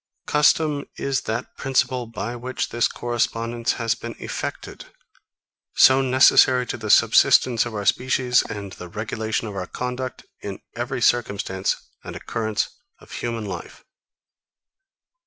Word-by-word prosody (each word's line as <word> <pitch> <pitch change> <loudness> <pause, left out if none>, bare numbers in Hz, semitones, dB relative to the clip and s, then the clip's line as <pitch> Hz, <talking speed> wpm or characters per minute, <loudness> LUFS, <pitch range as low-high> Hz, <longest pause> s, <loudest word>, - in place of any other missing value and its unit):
Custom 150 -1 +2
is 135 -2 -1
that 115 +3 -3
principle, 130 -2 0
by 115 +1 -5
which 125 +2 -4
this 120 0 +1
correspondence 115 0 -1
has 115 -1 0
been - - -8
effected; - - -6 0.9
so 130 0 +6
necessary 130 0 +5
to - - -4
the 110 -2 -6
subsistence 120 +3 +5
of 115 - -7
our 105 -1 -3
species, 125 +2 +2
and 100 -2 -7
the 90 - -9
regulation 110 +2 -3
of 105 - -7
our 90 -2 -4
conduct, 125 +1 -5 0.2
in 100 -1 -6 0.2
every 120 +1 -3
circumstance 100 -5 +1 0.3
and - - -8
occurrence 110 -2 -2 0.3
of - - -18
human 115 -2 -4
life. 90 -4 -8
120 Hz, 130 wpm, -23 LUFS, 110-130 Hz, 0.9 s, so